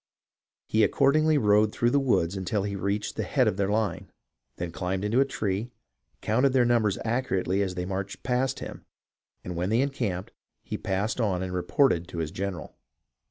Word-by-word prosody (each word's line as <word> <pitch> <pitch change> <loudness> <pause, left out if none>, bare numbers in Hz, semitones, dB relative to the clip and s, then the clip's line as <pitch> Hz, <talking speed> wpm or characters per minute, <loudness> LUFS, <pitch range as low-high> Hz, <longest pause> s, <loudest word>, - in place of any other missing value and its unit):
He 110 - +1
ac 105 - +2
cordingly 155 +3 +4
rode 105 -3 +4
through 120 +2 +1
the 140 - +4
woods 100 -9 +1
until 95 +2 -1
he 100 0 -3
reached 100 +2 -2
the - - 0
head - - +2
of - - +1
their 100 -1 0
line; 105 0 -1 0.4
then 85 -1 -4
climbed 95 +3 -2
into 115 +5 +2
a 135 - +5
tree, 110 -3 -2 0.5
counted 125 +5 +2
their 125 -2 +4
numbers 115 -4 +2
accurately 100 -5 0
as 95 -2 -1
they 90 0 -3
marched 95 +1 -4
past 125 +1 0
him, - - -7 0.6
and 90 - -5
when 90 +3 -1
they 115 +3 +3
encamped, 115 -10 -2 0.3
he - - -5
passed 100 +6 -1
on 95 -4 0
and 90 -1 -4
reported 90 - +2
to - - -8
his 80 -2 -2
general." 95 -3 -5
100 Hz, 185 wpm, -27 LUFS, 95-120 Hz, 0.6 s, a